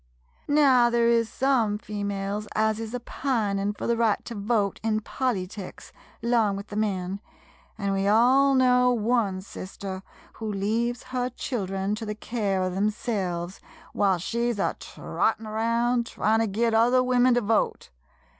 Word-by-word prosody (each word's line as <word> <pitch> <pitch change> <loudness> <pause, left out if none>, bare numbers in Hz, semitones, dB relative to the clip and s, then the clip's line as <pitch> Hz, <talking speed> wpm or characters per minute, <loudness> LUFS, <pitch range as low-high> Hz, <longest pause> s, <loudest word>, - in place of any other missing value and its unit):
Now, 270 -5 +5
there 235 0 +2
is 230 -1 +3
some 245 -6 +1
females 205 0 -4
as 220 0 +1
is 225 +1 -5
a - - -2
pinin' 210 -6 -1
fur - - -6
the 235 - +2
right 225 -3 +1
to 235 - -6
vote 205 -1 0
in 220 -1 0
polyticks, 205 -6 -4 0.3
'long 230 -4 +2
with 200 +1 -7
the 205 - -7
men, 195 -3 -1 0.6
an' 200 -2 -1
we 195 0 0
all 260 +6 +5
know 250 -1 +4
one 225 -5 +1
sister 190 0 -7 0.4
who 220 -1 -2
leaves 225 +4 -1
her 250 0 0
children 195 -6 -3
to 220 +1 -4
the 210 - -3
care 205 -4 -1
of 185 -1 -2
umselves, 195 -4 -2 0.3
whilst 190 -4 +1
she 235 +1 0
's 230 - -5
a 195 - 0
trottin' 220 0 -2
round, 230 +2 0
tryin' 220 0 +1
to 225 - +1
git 225 +3 0
other 245 +3 +4
women 250 0 +3
to 245 - +2
vote. 215 - 0
220 Hz, 155 wpm, -26 LUFS, 200-240 Hz, 0.6 s, Now